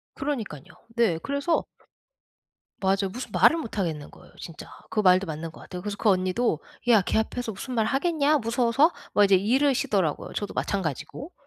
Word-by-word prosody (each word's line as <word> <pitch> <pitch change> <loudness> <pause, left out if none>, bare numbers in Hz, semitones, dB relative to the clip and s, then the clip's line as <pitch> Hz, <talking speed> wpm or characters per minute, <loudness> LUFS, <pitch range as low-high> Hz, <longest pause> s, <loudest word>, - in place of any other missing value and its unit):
그러니깐요. 235 - -4 0.3
네, 225 -9 +2
그래서 280 +4 0 1.2
맞아요. 195 0 +1
무슨 250 +3 -6
말을 330 - +5
못 230 -9 -6
하겠는 160 -6 -2
거예요, - - -17
진짜. 165 - -9 0.2
그 215 - +1
말도 185 -1 +4
맞는 160 0 -5
것 - - -14
같아요. 180 0 -8
그래서 205 0 -4
그 225 - +1
언니도 185 0 +1 0.3
"야 220 -4 +6
걔 200 - 0
앞에서 225 +1 -2
무슨 250 +6 -6
말을 220 -2 +1
하겠냐, 305 0 +2
무서워서?" 240 +6 +2 0.2
막 205 - +6
이제 195 - +5
이러시더라고요. 210 - +1
저도 205 - -4
마찬가지고. 190 - -3
215 Hz, 385 characters per minute, -26 LUFS, 185-260 Hz, 1.2 s, 야